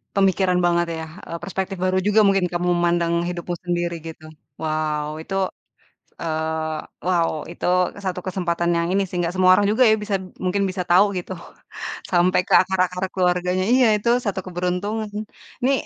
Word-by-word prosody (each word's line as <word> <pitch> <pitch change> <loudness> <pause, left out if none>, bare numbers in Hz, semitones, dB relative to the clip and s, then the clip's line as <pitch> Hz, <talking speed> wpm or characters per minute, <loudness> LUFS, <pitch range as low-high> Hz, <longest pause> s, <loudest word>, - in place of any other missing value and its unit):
pemikiran 190 -2 +3
banget 170 0 +2
ya. 160 - -5 0.2
Eee, 170 - -6
perspektif 190 -1 -3
baru 185 0 +1
juga 210 +1 +4
mungkin 195 -2 +3
kamu 175 0 -1
memandang 170 -1 +1 0.2
hidupmu 175 0 -4
sendiri 175 -1 -1
gitu. 160 -1 -10 0.4
Wow, 155 -1 -1 0.2
itu 195 - -5 0.9
eee, 160 -1 -2 0.3
wow, 175 -2 +2 0.2
itu - - -5 0.4
satu 180 -1 -2
kesempatan 175 -2 -1
yang 170 0 +1
ini 200 - +3
sih 180 - -6
gak 170 +2 -2
semua 185 0 +4
orang 205 - +3
juga 240 +4 +3
ya - - +6
bisa 205 -1 -2
b - - -9 0.2
mungkin 200 +2 +1
bisa 185 -1 -3
tahu 185 +3 +7
gitu 180 - -6 0.8
sampai 180 +1 +3
ke - - -11
akar-akar 185 0 -1
keluarganya. 180 0 +1
Iya, 255 -2 +5
itu 235 +3 -1 0.2
satu 195 -2 -1
keberuntungan. 185 +5 -2 0.6
Ini, 265 - +4
180 Hz, 165 wpm, -22 LUFS, 170-190 Hz, 0.9 s, tahu